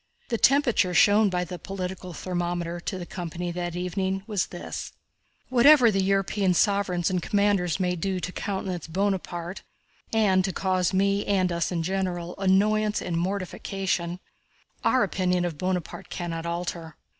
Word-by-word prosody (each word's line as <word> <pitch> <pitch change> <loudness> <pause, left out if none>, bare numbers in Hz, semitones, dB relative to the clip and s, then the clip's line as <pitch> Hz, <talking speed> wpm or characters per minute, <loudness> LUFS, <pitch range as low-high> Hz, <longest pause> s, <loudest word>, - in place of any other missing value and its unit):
The 230 -3 -1
temperature 240 -10 +3
shown 205 +3 +5
by 180 -1 0
the 180 0 -7
political 185 -1 -5
thermometer 175 0 -3
to 190 +2 -4
the 175 - -6
company 175 0 -5
that 175 0 -4
evening 190 +2 -2
was 210 -5 -1
this: 175 - -7 0.6
"Whatever 255 -1 +7
the 195 -1 +1
European 195 -1 +1
sovereigns 185 -3 +2
and 180 -1 0
commanders 200 -4 +1
may 180 -1 +1
do 185 +2 -2
to 180 - -4
countenance 190 -4 -4
Bonaparte, 180 -1 -2 0.5
and 200 -4 +3
to 190 - -1
cause 185 -1 0
me, 200 +1 +2
and 185 -3 +2
us 170 +1 -1
in 170 -2 -1
general, 180 -1 -2
annoyance 210 +2 +2
and 170 - -3
mortification, 185 -1 -2 0.6
our 255 - +4
opinion 180 -2 0
of 165 -4 -4
Bonaparte 185 0 -3
cannot 170 -1 -4
alter. 170 -2 -4
185 Hz, 145 wpm, -26 LUFS, 175-195 Hz, 0.6 s, Whatever